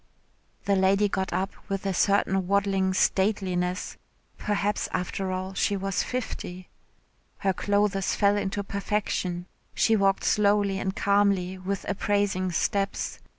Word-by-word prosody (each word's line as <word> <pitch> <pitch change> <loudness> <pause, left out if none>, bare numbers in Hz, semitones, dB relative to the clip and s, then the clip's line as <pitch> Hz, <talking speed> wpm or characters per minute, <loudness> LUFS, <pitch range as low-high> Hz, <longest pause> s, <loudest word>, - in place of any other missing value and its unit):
The 200 - +3
lady 195 +2 +3
got 190 -1 -2
up 190 +2 -1 0.2
with 195 0 -3
a 195 - 0
certain 195 -1 +2
waddling 195 -1 +2
stateliness 185 -2 0 0.4
(perhaps 205 0 -1
after 185 +1 -2
all 185 +1 -3
she 200 +1 +1
was 195 0 -1
fifty). 185 -7 -5 0.7
Her 195 -1 +1
clothes 200 0 +1
fell 200 -1 +3
into 205 0 -2
perfection 200 -3 -2 0.3
she 225 - +3
walked 195 -2 +2
slowly 205 -1 +2
and 190 0 -2
calmly 200 -2 +2
with 190 +1 -4
appraising 200 -2 0
steps. 195 +3 -1
195 Hz, 125 wpm, -26 LUFS, 190-200 Hz, 0.7 s, The